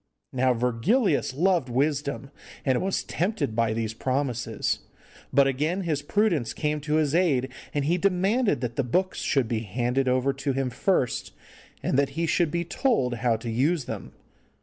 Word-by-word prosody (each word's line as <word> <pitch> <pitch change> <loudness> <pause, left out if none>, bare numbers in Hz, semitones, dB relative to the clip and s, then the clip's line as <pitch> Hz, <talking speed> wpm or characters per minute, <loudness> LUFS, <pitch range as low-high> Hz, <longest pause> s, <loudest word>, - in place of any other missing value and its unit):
Now 130 -1 +2
Virgilius 135 - +1
loved 170 -4 +2
wisdom, 140 +1 -1 0.3
and 130 -3 +2
was 190 0 -1
tempted 170 - -2
by 115 -1 +2
these 110 0 -2
promises, 125 -2 -1 0.5
but 140 +1 +5
again 150 +8 0
his 155 -5 -1
prudence 165 - +1
came 150 0 -1
to 150 +1 -1
his 155 -2 +2
aid, 145 -7 +2 0.2
and 145 -1 -1
he 175 +4 +1
demanded 195 - +2
that 120 -2 -4
the 140 - +2
books 185 +10 0
should 135 -5 +1
be 115 -1 -1
handed 120 +5 -1
over 130 +2 +2
to 135 0 -2
him 135 -1 -1
first, 130 - 0 0.5
and 135 - +2
that 140 - +2
he 165 - +1
should 170 0 +2
be 170 +2 -2
told 160 - 0
how 115 0 +2
to 115 +1 -5
use 140 +5 +1
them. - - -6
140 Hz, 170 wpm, -26 LUFS, 125-170 Hz, 0.5 s, but